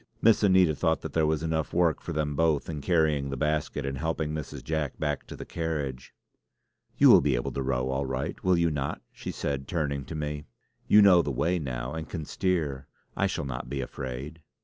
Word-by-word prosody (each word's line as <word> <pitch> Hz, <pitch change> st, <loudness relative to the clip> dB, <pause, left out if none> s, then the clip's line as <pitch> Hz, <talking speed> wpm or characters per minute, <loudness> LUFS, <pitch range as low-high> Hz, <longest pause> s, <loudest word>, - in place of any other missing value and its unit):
Miss 115 Hz, -1 st, +5 dB
Anita 95 Hz, -5 st, +5 dB
thought 80 Hz, +2 st, 0 dB
that -, -, -6 dB
there 80 Hz, -2 st, +2 dB
was 80 Hz, 0 st, 0 dB
enough 80 Hz, -1 st, -2 dB
work 85 Hz, -2 st, +2 dB
for -, -, -6 dB
them 75 Hz, -2 st, -1 dB
both 80 Hz, -2 st, +2 dB
in 75 Hz, -3 st, -4 dB
carrying 75 Hz, -4 st, +2 dB
the 70 Hz, -, -4 dB
basket 75 Hz, 0 st, -1 dB
and 70 Hz, -1 st, -3 dB
helping 80 Hz, -1 st, -1 dB
Mrs. 75 Hz, -2 st, -6 dB
Jack 80 Hz, -3 st, -2 dB
back 75 Hz, -2 st, -2 dB
to -, -, -8 dB
the -, -, -8 dB
carriage. 75 Hz, -6 st, -4 dB, 0.8 s
"You -, -, +8 dB
will -, -, +8 dB
be 70 Hz, -3 st, +2 dB
able -, -, -2 dB
to 70 Hz, -, -3 dB
row 65 Hz, -1 st, 0 dB
all 65 Hz, +1 st, -1 dB
right, 65 Hz, +5 st, -4 dB
will 95 Hz, -1 st, +3 dB
you 85 Hz, -1 st, +2 dB
not?" 70 Hz, -2 st, -3 dB
she -, -, -8 dB
said, 70 Hz, -2 st, -3 dB
turning 70 Hz, -5 st, -1 dB
to 80 Hz, -, -7 dB
me. 75 Hz, -1 st, -4 dB, 0.4 s
"You 105 Hz, 0 st, +7 dB
know 90 Hz, -3 st, +7 dB
the 75 Hz, -, -3 dB
way 85 Hz, +7 st, 0 dB
now 65 Hz, -3 st, -4 dB
and 80 Hz, -1 st, -5 dB
can 80 Hz, -4 st, -5 dB
steer. 75 Hz, -8 st, -1 dB, 0.3 s
I -, -, +2 dB
shall -, -, -3 dB
not 65 Hz, -2 st, -5 dB
be 70 Hz, +1 st, -3 dB
afraid!" 65 Hz, +4 st, -6 dB
75 Hz, 215 wpm, -28 LUFS, 70-80 Hz, 0.8 s, You